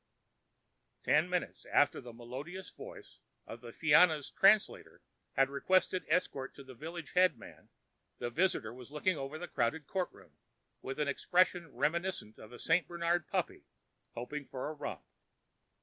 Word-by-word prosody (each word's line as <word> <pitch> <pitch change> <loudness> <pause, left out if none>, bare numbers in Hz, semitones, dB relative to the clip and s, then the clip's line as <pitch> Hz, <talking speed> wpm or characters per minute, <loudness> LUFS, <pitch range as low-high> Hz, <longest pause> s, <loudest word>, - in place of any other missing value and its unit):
Ten 155 +4 +3
minutes 180 -1 -2
after 145 - +3
the 120 -2 -9
melodious 135 +11 -8
voice - - -11 0.3
of 115 - -9
the 120 -1 -9
Fianna's 155 +1 +4
translator 210 +2 +3 0.3
had 135 - +4
requested 185 +6 +1
escort 135 -7 0
to 140 - -10
the 130 -1 -11
village 160 +4 -7
headman, 180 -9 +1 0.5
the 120 0 -3
visitor 155 -8 +1
was 125 0 -11
looking 150 +5 0
over 140 +1 -5
the 175 +2 -6
crowded 135 +5 -1
courtroom 185 +2 -5 0.4
with 135 +3 -5
an 150 - +1
expression 175 +2 +2
reminiscent 150 - -1
of 110 - -12
a 120 - -9
St. 165 +6 +2
Bernard 170 -1 0
puppy - - -2 0.5
hoping 145 +5 -4
for 130 +1 -5
a - - -4
romp. 150 -2 -6
150 Hz, 145 wpm, -33 LUFS, 130-175 Hz, 0.5 s, Fianna's